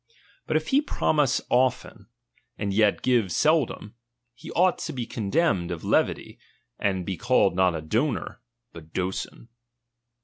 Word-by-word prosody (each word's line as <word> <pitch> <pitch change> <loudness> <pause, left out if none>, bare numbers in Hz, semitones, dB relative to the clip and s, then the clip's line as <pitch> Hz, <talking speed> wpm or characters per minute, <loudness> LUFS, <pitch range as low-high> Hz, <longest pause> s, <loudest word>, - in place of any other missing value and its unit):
But - - +2
if - - -4
he 280 +1 +4
promise 150 - +1
often, 125 -4 0 0.5
and 100 -2 -2
yet 105 0 +2
give 120 -7 +2
seldom, 150 - +1 0.4
he - - -12
ought 185 +1 +2
to - - -5
be 125 -3 -4
condemned 105 - 0
of 85 -2 -5
levity, - - 0 0.4
and 95 -3 -1
be 95 -1 -4
called 120 -7 +2
not 90 -2 +2
a 80 - -4
donor, 120 - -2 0.3
but 80 -1 -13
doson. 95 +5 -4
110 Hz, 140 wpm, -25 LUFS, 95-130 Hz, 0.5 s, he